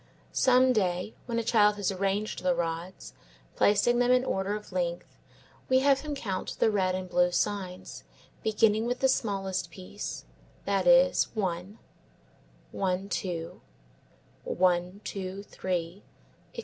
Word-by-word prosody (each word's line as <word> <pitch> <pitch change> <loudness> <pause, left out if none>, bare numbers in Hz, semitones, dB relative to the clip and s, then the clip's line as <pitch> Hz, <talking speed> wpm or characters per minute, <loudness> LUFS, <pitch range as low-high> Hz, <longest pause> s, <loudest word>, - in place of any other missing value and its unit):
Some 255 0 +4
day, 185 -1 -1
when 235 -1 -2
a 230 - 0
child 210 -2 +4
has 205 -1 -1
arranged 195 +2 -2
the 180 -1 +2
rods, 170 +2 -4 0.4
placing 225 +4 +3
them 245 0 +3
in 255 0 +4
order 195 -1 -1
of 210 -1 -9
length, 175 -1 -3 0.5
we 260 - +5
have 275 0 +4
him 295 0 -5
count 195 -8 -4
the 220 - +3
red 185 -3 +1
and 185 0 -4
blue 180 0 +2
signs, 185 -1 -3 0.4
beginning 220 +1 +2
with 245 +1 -2
the 265 - +5
smallest 195 -7 -1
piece; 190 +2 -7 0.4
that - - 0
is, - - +5
one; 190 0 -3 0.9
one, 190 0 -2
two; 170 -5 -4 0.8
one, 180 +2 0
two, 195 0 -5
three, 180 -1 -4 0.5
etc. - - -10
195 Hz, 135 wpm, -28 LUFS, 185-225 Hz, 0.9 s, we